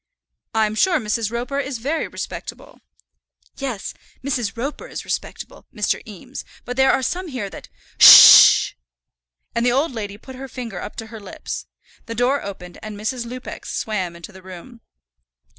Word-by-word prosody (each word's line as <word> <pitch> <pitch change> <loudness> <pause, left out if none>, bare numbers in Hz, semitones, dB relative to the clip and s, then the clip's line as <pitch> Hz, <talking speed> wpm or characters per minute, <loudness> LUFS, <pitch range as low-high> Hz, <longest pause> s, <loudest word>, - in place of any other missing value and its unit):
"I'm 215 -1 +1
sure 355 +11 +2
Mrs. 215 -1 -2
Roper 245 +4 -3
is 270 -2 -4
very 285 +8 -2
respectable." - - -8 0.8
"Yes; 255 -8 -5 0.3
Mrs. 245 -6 -2
Roper 275 +6 -5
is - - -7
respectable, - - -6
Mr. - - -1
Eames; - - -9 0.2
but 245 - -5
there 265 0 +4
are 265 - 0
some 365 +7 -3
here 240 - -5
that - - -11 0.3
Hush - - +12
sh - - +11 0.2
sh!" - - -28 0.8
And 235 - -1
the 245 - +3
old 275 +5 +1
lady 205 -4 -6
put 260 +4 -12
her 270 +1 -8
finger 235 -8 -7
up - - -8
to 225 - -7
her 220 - -8
lips. 205 - -7 0.4
The 230 - -5
door 250 +4 +1
opened 180 -3 -9
and 215 -1 -8
Mrs. 235 +2 -3
Lupex 250 +1 -8
swam 190 -6 -3
into 170 +4 -11
the 190 -1 -14
room. 190 +6 -12
235 Hz, 170 wpm, -21 LUFS, 210-265 Hz, 0.8 s, Hush